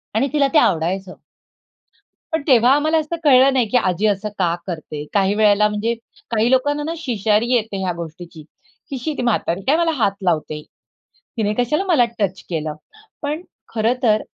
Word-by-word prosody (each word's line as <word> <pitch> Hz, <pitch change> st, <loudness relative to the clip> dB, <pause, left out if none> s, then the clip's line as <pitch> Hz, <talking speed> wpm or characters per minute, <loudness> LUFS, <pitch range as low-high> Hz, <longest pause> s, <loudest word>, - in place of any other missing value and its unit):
आणि 245 Hz, +5 st, +2 dB
तिला 290 Hz, -2 st, +3 dB
ते -, -, +5 dB
आवडायचं. 185 Hz, -, 0 dB, 1.2 s
पण 320 Hz, -, 0 dB
तेव्हा 250 Hz, -2 st, +5 dB
आम्हाला 310 Hz, +2 st, +2 dB
असं 310 Hz, +2 st, -3 dB
कळलं 270 Hz, -1 st, +6 dB
नाही 250 Hz, -4 st, +2 dB
की 250 Hz, -, +3 dB
आजी 190 Hz, -1 st, +1 dB
असं 210 Hz, +1 st, -1 dB
का 175 Hz, -3 st, +2 dB
करते? 155 Hz, -3 st, -5 dB
काही 195 Hz, -1 st, +2 dB
वेळेला 210 Hz, 0 st, +4 dB
म्हणजे 210 Hz, +3 st, -1 dB, 0.4 s
काही 225 Hz, +1 st, +2 dB
लोकांना 290 Hz, +3 st, +2 dB
ना 325 Hz, +2 st, -3 dB
शिशारी 225 Hz, -, 0 dB
येते 220 Hz, -4 st, 0 dB
ह्या 185 Hz, -, -1 dB
गोष्टीची 165 Hz, -1 st, -9 dB, 0.5 s
की, 275 Hz, -, -4 dB
"शी 280 Hz, +5 st, -3 dB
ती -, -, -2 dB
म्हातारी 195 Hz, -6 st, 0 dB
काय 300 Hz, -, +4 dB
मला 335 Hz, -1 st, +2 dB
हात 200 Hz, -, +3 dB
लावते? 155 Hz, -3 st, -1 dB, 0.8 s
तिने 210 Hz, -2 st, 0 dB
कशाला 300 Hz, +9 st, +1 dB
मला 290 Hz, -9 st, +5 dB
टच 190 Hz, -2 st, -1 dB
केलं?" 155 Hz, -3 st, -3 dB, 0.5 s
पण 300 Hz, +4 st, -3 dB, 0.3 s
खरंतर 225 Hz, -1 st, +2 dB
220 Hz, 165 wpm, -20 LUFS, 190-270 Hz, 1.2 s, कळलं